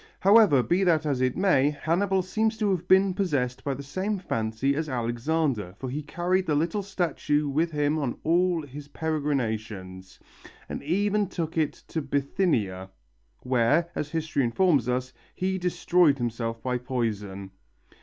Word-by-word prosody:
However, 200 - +6
be 175 - +1
that 160 -3 +3
as 140 -4 0
it 130 -1 +1
may, 180 -8 +3
Hannibal 180 +6 0
seems 220 +4 0
to 210 -2 +1
have 180 -3 -2
been 190 0 +5
possessed 140 -10 -1
by 140 -2 -1
the 140 - -7
same 190 +9 -2
fancy 115 - -1
as 155 +1 -2
Alexander, 120 - -1
for 130 0 -5
he 150 +3 -3
carried 180 +4 -1
the 150 - +2
little 165 +7 0
statue 165 -6 -1
with 155 +5 +1
him 150 0 0
on 135 -5 -2
all 175 0 +2
his 145 +1 -10
peregrinations, 110 -12 -3 0.5
and - - -5
even 205 +6 +1
took 165 -3 -4
it 155 -3 +1 0.2
to 160 - -2
Bithynia, 135 - -1 0.5
where, 130 +7 +2
as 150 - -3
history 155 -3 -1
informs 140 - +2
us, 130 +1 -2 0.2
he 190 +1 -1
destroyed 175 -3 +3
himself 115 -2 -3
by 125 -1 -1
poison. 105 -6 -3
150 Hz, 155 wpm, -26 LUFS, 125-180 Hz, 0.5 s, However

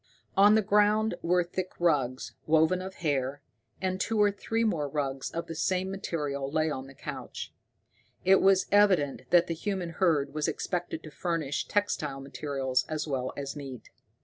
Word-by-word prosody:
On 205 +2 +7
the 220 - +3
ground 210 +2 +3
were 180 +1 +2
thick 185 +1 -4
rugs, 140 -7 0
woven 160 +3 +3
of 190 +1 -7
hair, 140 -1 0 0.4
and 185 0 -1
two 225 +2 0
or 205 -1 +5
three 225 +3 -1
more 165 -10 0
rugs 135 -2 -2
of 170 0 -4
the 165 - -6
same 185 +3 0
material 145 -8 -3
lay 155 0 +1
on 130 -2 -5
the 135 - -14
couch. - - -7 0.7
It 190 +1 +6
was 195 -1 +5
evident 175 -11 +3
that 175 -1 +5
the 165 - -2
human 180 0 -3
herd 155 -5 +1
was 155 -1 -1
expected 175 -2 -3
to 155 - -10
furnish 160 -4 -2
textile 155 -9 -1
materials 135 -2 -1
as 155 0 -2
well 130 -3 -2
as 140 0 -4
meat. 135 -4 -8
165 Hz, 170 wpm, -29 LUFS, 140-190 Hz, 0.7 s, On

